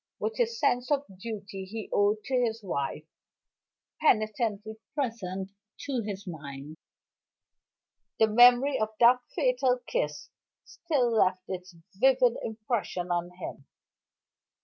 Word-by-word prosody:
With 450 - -3
his 465 -1 0
sense 245 +1 +1
of 285 -1 +1
the 190 - -15
duty 200 -1 -6
he 215 +3 -6
owed 205 +1 +2
to 270 - -6
his 230 -3 0
wife 145 -5 -3 1.0
penitently 215 -4 +1 0.2
present 195 -8 -3 0.3
to 265 -4 -2
his 200 -1 -6
mind, 145 -3 -8 1.4
the 220 - +6
memory 245 +5 +6
of 215 0 0
that 245 +1 +7 0.2
fatal 255 -1 +2
kiss - - -3 0.3
still 275 -8 0
left 185 -3 +2
its 185 -1 -7 0.2
vivid 255 +2 +4
impression 215 -5 -3
on 175 0 0
him. 140 -6 -8
220 Hz, 120 wpm, -28 LUFS, 190-250 Hz, 1.4 s, that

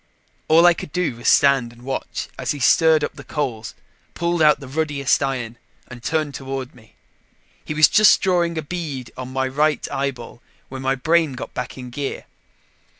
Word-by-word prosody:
All 165 +2 +6
I 175 - +7
could 160 - -8
do 180 -9 -1
was 120 - -5
stand 135 -4 +4
and 120 +1 -17
watch 135 +1 -4
as - - -2
he 145 - -7
stirred 160 +3 +4
up - - -2
the 140 - -10
coals, 125 -9 -4 0.4
pulled 170 0 -1
out 150 -1 +5
the 140 - -10
ruddiest 145 -1 0
iron 125 -4 -3 0.3
and 125 -1 -10
turned 155 +1 -1
toward 135 -1 -6
me. 110 -3 -20 0.7
He 150 - -5
was 155 -1 +7
just 215 0 +5
drawing 175 -3 +1
a 160 - -2
bead 145 -7 -5
on 130 0 -7
my 130 0 -1
right 150 +3 0
eyeball 135 -3 -4 0.3
when 130 0 -7
my 135 0 0
brain 160 +2 +1
got 125 - -8
back 125 - -5
in 125 -1 -8
gear. 140 +2 -5
140 Hz, 185 wpm, -21 LUFS, 130-155 Hz, 0.7 s, I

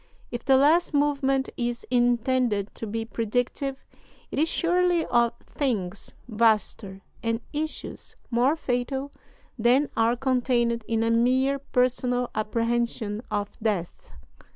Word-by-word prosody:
If 240 0 -5
the 265 -1 +5
last 305 +4 +4
movement 275 -2 +2
is 240 -1 -2
intended 240 -3 +1
to 225 - -6
be 225 +2 -3
predictive, 245 +4 -2 0.5
it - - -2
is 320 +2 +2
surely 350 -1 +2
of 235 -1 +2
things 210 -9 -3
vaster 215 -3 +1 0.2
and 230 0 -1
issues 310 +1 -5 0.2
more 250 +6 +3
fatal 265 0 -2 0.5
than 250 +6 +3
are 225 +1 +3
contained 245 -2 +1
in 225 -1 +1
a 230 - +1
mere 260 +4 +2
personal 250 -1 0
apprehension 230 0 -1
of 205 0 -2
death. 200 -6 -1
245 Hz, 120 wpm, -26 LUFS, 225-270 Hz, 0.5 s, the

